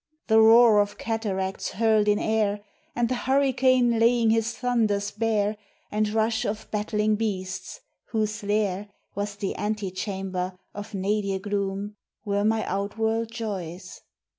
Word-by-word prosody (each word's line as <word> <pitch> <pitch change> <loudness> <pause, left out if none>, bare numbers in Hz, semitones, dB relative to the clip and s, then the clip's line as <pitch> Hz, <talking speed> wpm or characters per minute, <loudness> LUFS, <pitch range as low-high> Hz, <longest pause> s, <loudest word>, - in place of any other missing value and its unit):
The 220 0 +5
roar 225 -1 +7
of 205 0 -3
cataracts 195 -4 -3
hurled 220 -1 +3
in 205 0 +4
air, 210 -2 0 0.3
And 240 0 +1
the 255 - -1
hurricane 255 -2 +2
laying 230 -1 +4
his 225 +1 +1
thunders 215 -5 0
bare, 215 -1 0 0.3
And 210 0 +1
rush 220 +1 +1
of 215 -1 -3
battling 210 0 0
beasts, 205 - -4 0.2
whose 215 -1 -2
lair 205 -1 -1 0.2
Was 205 0 -3
the 200 -1 -3
antechamber 190 -3 -3 0.2
of 205 +1 -7
nadir 195 0 0
gloom, 200 +1 -3 0.3
Were 200 0 0
my 220 +1 +1
outworld 220 +3 -1
joys. 190 -6 -6
210 Hz, 130 wpm, -25 LUFS, 200-225 Hz, 0.3 s, roar